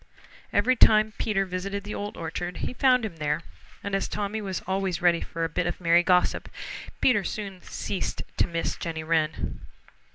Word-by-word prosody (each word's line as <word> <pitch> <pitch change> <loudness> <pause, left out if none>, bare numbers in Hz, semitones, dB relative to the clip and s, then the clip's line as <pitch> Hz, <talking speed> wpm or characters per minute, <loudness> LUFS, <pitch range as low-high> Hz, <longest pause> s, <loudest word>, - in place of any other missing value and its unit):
Every 240 +6 +3
time 215 -2 +6
Peter 195 -3 +1
visited 195 +2 -3
the 205 - -5
Old 205 0 -5
Orchard 175 +2 -4
he - - -3
found 255 -2 +4
him 180 -7 -6
there, 150 +1 0 0.4
and 200 - -4
as 195 - +1
Tommy 210 +1 -2
was 190 -3 -3
always 190 -1 0
ready 175 -1 +4
for 165 - -4
a - - +2
bit 170 +2 -1
of 175 - -3
merry 170 -1 +5
gossip, 180 0 +2 0.5
Peter 235 -6 +4
soon 195 -4 -5
ceased 195 - -3
to - - +3
miss 165 -1 -2
Jenny 160 -1 -4
Wren. 155 -1 0
190 Hz, 175 wpm, -27 LUFS, 170-205 Hz, 0.5 s, time